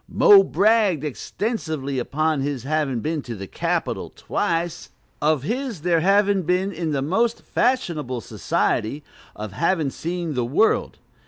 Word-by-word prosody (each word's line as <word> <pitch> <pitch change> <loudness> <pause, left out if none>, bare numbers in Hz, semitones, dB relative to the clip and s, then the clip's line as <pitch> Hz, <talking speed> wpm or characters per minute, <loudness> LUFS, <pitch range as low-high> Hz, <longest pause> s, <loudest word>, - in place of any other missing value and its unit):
"Mo" 415 -5 +7
bragged 210 - +2
extensively 155 - -3
upon 155 +3 0
his 140 -3 -3
having 140 -4 -1
been 155 +2 -2
to 120 -3 -7
the 100 -1 -7
"Capitol" - - -2
twice, 170 0 -2 0.3
of 150 -3 +2
his 235 - -3
there 170 0 +2
having 200 +2 +3
been 180 +3 0
in 165 -3 -3
the 135 -2 0
most 225 +10 0
"fashionable 170 - 0
society," 135 +6 -1 0.3
of 105 -1 -6
having 165 - 0
seen 170 0 -4
the 125 -2 0
world. 145 - +1
160 Hz, 140 wpm, -23 LUFS, 140-195 Hz, 0.3 s, Mo